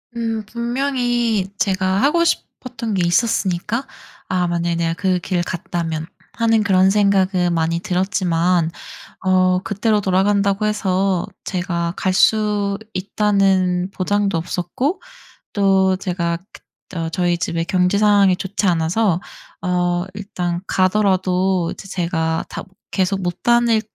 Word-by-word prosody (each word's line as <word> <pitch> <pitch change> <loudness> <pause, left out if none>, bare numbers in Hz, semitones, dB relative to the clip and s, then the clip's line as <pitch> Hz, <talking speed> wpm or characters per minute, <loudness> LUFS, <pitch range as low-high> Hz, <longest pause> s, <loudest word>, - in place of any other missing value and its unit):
음. 225 -2 -2
분명히 240 -3 -1
제가 190 0 +1
하고 335 +4 +3
싶었던 250 -8 -3
게 180 -3 +1
있었으니까 215 +4 0 0.4
'아 180 -1 +1
만약에 170 0 -1
내가 165 0 0
그 180 +1 0
길 175 0 -1
갔다면.' 165 -3 -3 0.3
하는 225 -1 +2
그런 190 -1 +4
생각은 195 -3 +2
많이 165 0 0
들었지만 180 -2 +1 0.5
어 185 -1 +3
그때로 210 +2 0
돌아간다고 200 +2 +1
해서 195 -3 0 0.2
제가 175 -2 -2
갈 190 - 0
수 205 0 +2 0.2
있다는 190 -2 +1
보장도 200 0 0
없었고 185 - -2 0.5
또 190 -2 +3
제가 170 -3 -2 0.2
그 - - -14 0.3
어 165 -1 -2
저희 175 +1 0
집에 170 -1 -1
경제상황이 195 +1 +3
좋지 195 +1 -2
않아서 175 +2 +1 0.4
어 175 -1 0
일단 180 -4 -4
가더라도 185 -2 +1
이제 195 - -9
제가 165 -3 -1
다 - - -6
못 190 - -19 0.2
'계속 190 0 0
못 175 0 -3
다닐 235 -2 +3
190 Hz, 255 characters per minute, -20 LUFS, 175-210 Hz, 0.5 s, 그런